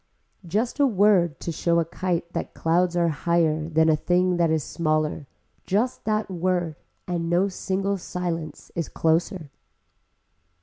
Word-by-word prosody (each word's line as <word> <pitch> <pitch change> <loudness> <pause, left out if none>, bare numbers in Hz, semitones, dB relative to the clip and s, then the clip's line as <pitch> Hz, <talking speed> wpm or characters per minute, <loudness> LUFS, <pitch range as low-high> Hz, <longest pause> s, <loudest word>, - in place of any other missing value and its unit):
Just 225 - -1
a 285 - +5
word 195 - +3
to 170 - -3
show 170 +1 +1
a 165 - +1
kite 170 0 -3
that - - -4
clouds 175 +2 +1
are 170 -1 +3
higher 160 0 +1
than 160 0 +3
a 160 - +5
thing 180 +3 +1
that 170 -1 +3
is 160 -2 +1
smaller, 155 -3 -1 0.4
just 225 +7 0
that 215 0 0
word 175 -2 -1 0.3
and 170 -2 -2
no 175 +3 +3
single 195 +1 -2
silence 170 -4 -5
is 170 - -3
closer. 165 -1 0
170 Hz, 145 wpm, -24 LUFS, 160-185 Hz, 0.4 s, a